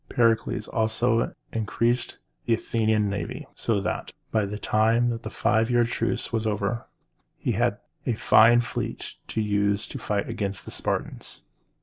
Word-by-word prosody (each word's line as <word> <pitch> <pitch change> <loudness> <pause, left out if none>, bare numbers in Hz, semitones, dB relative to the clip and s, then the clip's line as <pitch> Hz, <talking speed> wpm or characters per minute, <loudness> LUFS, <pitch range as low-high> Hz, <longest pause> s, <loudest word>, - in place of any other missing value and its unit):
Pericles 115 -2 +2
also 115 +1 +1 0.2
increased 115 +2 0 0.3
the 115 - +4
Athenian 110 -2 +1
navy, 100 0 -4
so 110 -3 0
that, - - -3 0.2
by 110 -2 +2
the 105 +1 -4
time 115 +2 +2
the - - -5
five 115 0 +1
years' 120 -1 +3
truce 120 0 -1
was 110 -1 0
over, 105 +2 -1 0.5
he - - -1
had - - +1 0.3
a 120 - +2
fine 115 +2 +6
fleet - - -4
to 110 - -1
use 100 -1 +1
in 135 - -5
fighting 105 -1 -1
against 100 -4 -3
the - - -7
Spartans. - - -3
110 Hz, 145 wpm, -26 LUFS, 105-115 Hz, 0.5 s, fine